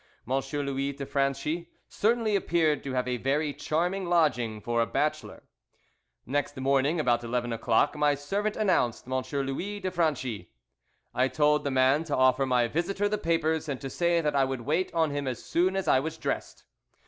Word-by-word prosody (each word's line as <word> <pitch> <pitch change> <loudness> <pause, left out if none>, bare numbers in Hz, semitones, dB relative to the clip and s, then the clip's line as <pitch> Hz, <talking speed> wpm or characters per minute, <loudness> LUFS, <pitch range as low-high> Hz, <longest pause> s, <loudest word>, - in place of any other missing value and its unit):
M. 130 - -2 0.3
Louis 140 0 -2
de 140 0 -6
Franchi 140 +5 -1 0.2
certainly 225 -1 +1
appeared 160 -6 +1
to 135 - -4
have 125 0 0
a 125 -1 -1
very 145 +4 0
charming 175 +6 -1
lodging 145 -11 +1
for 115 +2 0
a 115 - +1
bachelor. 155 +1 -2 0.8
Next 145 +2 -2
morning, 140 +4 +1
about 120 -5 +1
eleven 120 0 -2
o'clock, 115 0 +2
my 150 -1 +2
servant 200 +9 -2
announced 185 - +1
M. 130 - -6 0.3
Louis 185 +10 -4
de 185 -2 -3
Franchi. 130 - -1 0.6
I 130 +1 +2
told 150 +1 +2
the 140 - -1
man 130 +3 +3
to 145 - -1
offer 130 +1 +3
my 125 -2 +2
visitor 175 - -1
the 210 0 -1
papers 160 -2 0
and 135 -3 -3
to 135 - -6
say 170 +2 +1
that 150 -2 -1
I 135 - +4
would 135 -2 -2
wait 155 +9 0
on 160 -3 +1
him 145 -1 -3
as 125 -2 -4
soon 185 +3 +1
as 195 - -2
I 130 - +5
was 160 +3 -4
dressed. - - -4
145 Hz, 185 wpm, -28 LUFS, 130-170 Hz, 0.8 s, I